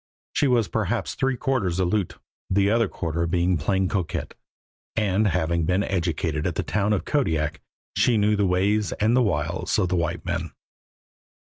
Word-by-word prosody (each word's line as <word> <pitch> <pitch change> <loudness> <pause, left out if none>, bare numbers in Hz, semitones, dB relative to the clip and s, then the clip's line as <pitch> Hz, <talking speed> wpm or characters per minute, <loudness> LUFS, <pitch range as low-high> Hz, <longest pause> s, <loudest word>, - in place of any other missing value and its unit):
She 145 - +2
was 120 -4 +3
perhaps 110 +1 -1
three 135 -1 0
quarters 120 - 0
Aleut, 95 +1 0 0.3
the 100 +1 +3
other 115 -1 +3
quarter 85 -2 -2
being 90 +1 +1
plain 95 +5 +1
coquette, 90 -2 -3 0.6
and, 105 -1 +2
having 85 -2 0
been 90 +3 +1
educated 80 -4 -1
at 85 - -2
the - - -1
town 105 0 0
of 105 - 0
Kodiak, 80 - 0 0.3
she 120 -3 +3
knew 105 0 +3
the 100 -1 +2
ways 100 +3 +1
and 110 +3 +2
the 130 - +4
wiles 85 -5 0
of 95 -4 +1
the 90 - +1
white 85 -1 -2
man. - - -3
95 Hz, 165 wpm, -24 LUFS, 85-110 Hz, 0.6 s, the